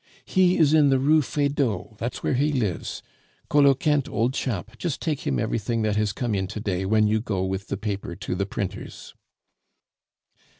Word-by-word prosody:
"He 185 -1 +3
is 155 -2 +4
in 150 -3 +5
the 135 - +4
Rue 150 +4 +4
Feydeau, 135 - -1
that's 120 +2 -4
where - - +1
he 145 +4 +2
lives. 110 - -2 0.5
Coloquinte, 145 0 +3
old 120 +3 0
chap, 115 -10 -3
just 170 -6 -2
take 155 -5 -3
him 65 - +1
everything 115 - -1
that 105 -1 +1
has 105 -1 +1
come 120 0 -2
in 95 -2 -1
to 105 - -6
day 95 -3 -2
when 110 +1 +3
you 110 +1 +2
go 100 -5 -2
with 95 +1 -3
the - - -3
paper 100 -4 -4
to - - -4
the 100 +2 -1
printers." 100 -1 -6
115 Hz, 180 wpm, -25 LUFS, 100-140 Hz, 0.5 s, in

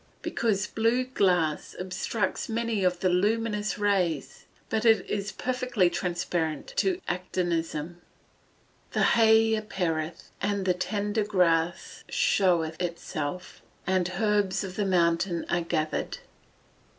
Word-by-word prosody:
_ - - -36
Because 210 -4 0
blue 230 +4 +1
glass 180 -11 +1
obstructs 190 +3 -2
many 225 -2 -1
of 180 -1 +1
the 185 - +3
luminous 210 +3 0
rays, 180 -9 0 0.2
but 220 - -1
it 225 -2 +4
is 200 -1 -2
perfectly 250 -7 0
transparent 170 -3 -2
to 380 -6 +2
actinism. 175 -2 -2
[Verse: 175 - -33
"The - - +2
hay 225 -1 +5
appeareth, 170 -7 -2
and 200 -1 0
the 185 - +3
tender 205 +3 -1
grass 175 -4 +1
showeth 170 -4 +2
itself, 170 -1 -4 0.2
and 185 -1 +1
herbs 205 -2 +1
of 185 -1 -6
the 205 - 0
mountain 170 -1 +1
are 175 - +2
gathered." 160 -2 -2
185 Hz, 120 wpm, -27 LUFS, 175-210 Hz, 0.2 s, hay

